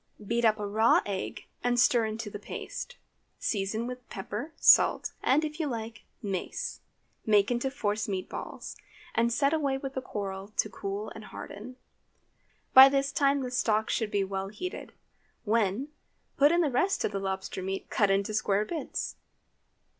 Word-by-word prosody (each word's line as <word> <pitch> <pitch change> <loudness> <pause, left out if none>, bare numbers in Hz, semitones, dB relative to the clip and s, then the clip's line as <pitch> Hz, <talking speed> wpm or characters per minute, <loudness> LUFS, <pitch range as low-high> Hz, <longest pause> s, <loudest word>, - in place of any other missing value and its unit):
Beat 235 +3 +1
up 215 -1 +4
a 210 - -2
raw 220 +3 +4
egg, 195 -2 -4 0.2
and 245 0 +2
stir 235 -1 +4
into 215 0 -5
the 205 - -6
paste; - - -7 0.4
season 215 +2 -1
with 250 0 -7
pepper, 210 +10 -5
salt, - - +5
and, 300 +4 +3
if 305 +1 -6
you 315 - 0
like, 225 -3 -5 0.2
mace; 195 -3 -3 0.4
make 210 0 +3
into 245 +2 0
force 215 -5 -2
meat 190 -2 -3
balls, - - -7 0.4
and 235 +1 +2
set 280 +5 +2
away 280 -4 +1
with 270 0 -6
the 260 - -3
coral 195 -5 -5
to 215 - +2
cool 200 +2 -4
and 220 -1 -10
harden. 225 +6 -9 1.0
By 265 +1 +11
this 275 0 +1
time 280 0 +2
the 250 - -4
stock 220 -3 +1
should 220 -3 0
be 200 -1 +1
well 195 0 -3
heated, 285 - -6 0.5
when, 225 +4 +1 0.5
put 290 +2 +5
in 345 +1 +3
the 300 -5 +1
rest 380 +11 +1
of - - -1
the 200 - -2
lobster 190 -1 -3
meat 190 +1 -4
cut 205 -3 +3
into 195 +2 +1
square 210 -1 +1
bits. 320 +7 -4
225 Hz, 170 wpm, -29 LUFS, 200-265 Hz, 1.0 s, By